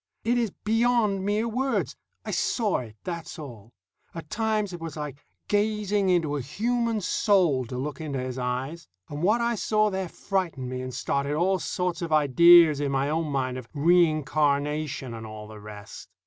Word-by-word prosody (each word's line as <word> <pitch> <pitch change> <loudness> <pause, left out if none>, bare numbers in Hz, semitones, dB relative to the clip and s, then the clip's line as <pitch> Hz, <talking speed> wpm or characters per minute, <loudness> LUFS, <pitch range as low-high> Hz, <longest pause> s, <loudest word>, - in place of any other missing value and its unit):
It 235 +2 +2
is 230 -2 0
beyond 220 -1 +1
mere 210 +3 0
words. 260 +4 -1 0.3
I - - -3
saw 220 -5 0
it, 115 -4 -9
that's 170 -2 -6
all. 120 -8 -10 0.4
At 165 -2 -8
times 215 -3 0
it 175 - -7
was 165 -2 -6
like 145 -1 -6 0.2
gazing 205 -1 +1
into 165 -5 +2
a - - -3
human 230 - -1
soul, 180 - +2
to 125 +2 -6
look 140 +3 -4
into 145 -3 -3
his 130 0 -4
eyes; 130 +7 -3 0.2
and 145 +1 -5
what 215 +7 +3
I 235 0 +1
saw 215 -1 +1
there 190 -2 -3
frightened 170 -12 -2
me 130 0 -4
and 130 0 -5
started 140 +3 -1
all 185 +4 +2
sorts 180 +1 -2
of 170 -2 -4
ideas 155 +1 +7
in 140 -1 0
my 135 +1 0
own 160 0 0
mind 130 -3 -2
of 120 - -11
reincarnation 150 -4 +1
and 115 -1 -7
all 110 0 -9
the 110 0 -11
rest. 105 0 -10
160 Hz, 175 wpm, -26 LUFS, 135-205 Hz, 0.4 s, ideas